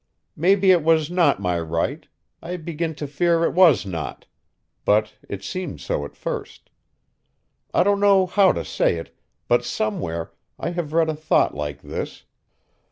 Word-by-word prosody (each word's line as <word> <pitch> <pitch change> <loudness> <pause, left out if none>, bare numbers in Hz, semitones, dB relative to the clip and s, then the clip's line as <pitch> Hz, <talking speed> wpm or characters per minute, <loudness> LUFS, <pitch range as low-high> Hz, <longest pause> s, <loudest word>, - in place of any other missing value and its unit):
Maybe 190 +3 +4
it 175 -2 +5
was 160 0 +3
not 175 - +3
my 90 -3 0
right 85 0 -2 0.3
I 180 +2 -5
begin 165 -1 -4
to 150 - -5
fear 165 +4 +1
it - - +1
was 170 - +5
not 85 -5 -5 0.6
but 105 +1 +2 0.2
it 100 -1 -6
seemed 180 - -5
so 70 - -2
at - - -11
first. - - -6 1.0
I - - +3
don't 200 +1 +2
know 200 -2 +5
how 190 +1 +4
to - - -4
say - - +1
it, 80 - -8 0.3
but 120 0 +3
somewhere 100 -8 -3 0.3
I 170 - -3
have 170 -4 -4
read 165 -1 +3
a 155 - -1
thought 155 +1 +2
like 75 -1 -5
this. - - -6
155 Hz, 165 wpm, -23 LUFS, -, 1.0 s, it